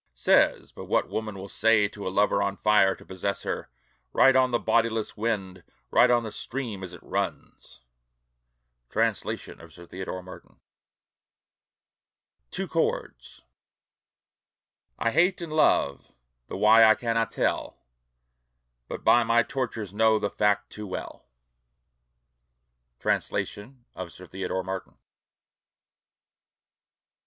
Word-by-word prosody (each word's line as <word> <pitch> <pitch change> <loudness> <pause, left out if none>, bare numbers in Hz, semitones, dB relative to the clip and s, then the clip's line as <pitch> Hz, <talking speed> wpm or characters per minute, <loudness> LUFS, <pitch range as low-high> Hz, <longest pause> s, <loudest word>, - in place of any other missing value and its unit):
Says 60 - +2
but - - -10
what - - 0
woman 110 -2 -4
will 95 +1 -7
say 110 0 +3
to 100 -1 -8
a - - +1
lover 100 +2 +2
on 100 0 -1
fire 105 -2 +4
to - - -17
possess 95 +1 -4
her, - - -4 0.4
Write 135 0 +5
on 130 -1 +4
the 120 - +1
bodiless 115 -2 0
wind, 105 -4 -3 0.3
write 125 - +5
on 120 -1 +3
the 110 - -6
stream 115 -2 -5
as 95 -2 -6
it 90 - -12
runs. 60 - -5 1.1
Translation - - -2
of 85 0 -14
Sir 85 +3 -13
Theodore 95 +1 -6
Martin. 95 0 -14 1.9
TWO - - -4
CHORDS - - -3 1.5
I 115 - 0
Hate 180 +7 +3
and 170 -3 -6
love 70 - +2 0.4
the - - -6
why 110 +3 +6
I 110 0 +7
cannot 115 -1 -1
tell. - - -1 1.1
But - - -7
by 120 - +5
my 115 +1 +3
tortures 115 -6 -4
know 110 +1 +4
the 105 -2 -2
fact 105 0 +1
too 105 0 -7
well. 95 - -7 1.7
Translation 120 +4 -3
of 90 -2 -7
Sir 90 - -12
Theodore 95 0 -4
Martin. 95 -2 -6
105 Hz, 125 wpm, -26 LUFS, 95-115 Hz, 1.9 s, I